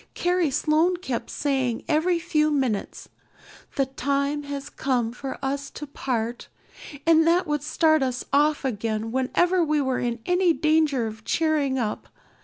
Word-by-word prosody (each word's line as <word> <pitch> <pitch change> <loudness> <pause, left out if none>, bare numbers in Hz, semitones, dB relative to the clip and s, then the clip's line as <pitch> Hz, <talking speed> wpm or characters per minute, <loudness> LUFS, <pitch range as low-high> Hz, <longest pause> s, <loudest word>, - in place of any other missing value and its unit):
Carrie 355 -2 +1
Sloane 310 +5 +2
kept 265 -10 -4
saying 265 -5 -1
every 335 +3 +2
few 325 -3 +1
minutes, 260 -9 -2 0.7
'The 275 - +2
time 280 +2 -1
has 280 -1 -5
come 245 -4 -1
for 265 +2 -6
us 280 +1 -2
to 295 - -8
part,' 240 -4 -3 0.6
and 325 0 +5
that 345 +2 +3
would 295 -2 -1
start 315 +1 +2
us 255 -2 -2
off 295 0 +3
again 225 -2 -2
whenever 340 +8 +2
we 305 -1 +1
were 265 -2 0
in 240 -1 -1
any 360 -1 +3
danger 310 -6 +2
of 220 0 -7
cheering 300 -4 +1
up. 220 -4 -3
280 Hz, 150 wpm, -25 LUFS, 255-315 Hz, 0.7 s, and